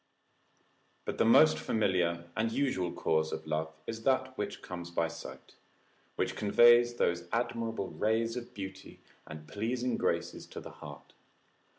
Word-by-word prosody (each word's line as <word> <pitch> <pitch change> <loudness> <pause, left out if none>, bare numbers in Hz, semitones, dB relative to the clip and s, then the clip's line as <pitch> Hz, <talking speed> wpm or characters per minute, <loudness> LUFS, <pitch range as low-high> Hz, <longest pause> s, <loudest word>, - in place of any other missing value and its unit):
But - - -4
the - - +4
most 80 - +6
familiar 85 -1 0
and 115 0 0
usual 115 -11 0
cause 80 0 0
of 80 - -5
love 80 0 -2
is 115 0 -5
that 130 +1 +1
which 105 -3 -4
comes 90 -1 -6
by 85 -1 0
sight, 85 0 -10 0.6
which - - -1
conveys 120 +3 +6
those 85 -6 0
admirable 115 -3 -2
rays 115 +2 0
of 120 -1 -6
beauty 95 -1 -8 0.3
and 75 0 -9
pleasing 120 +5 -1
graces - - -1
to - - -8
the - - -10
heart. - - -12
105 Hz, 145 wpm, -31 LUFS, 85-120 Hz, 0.6 s, most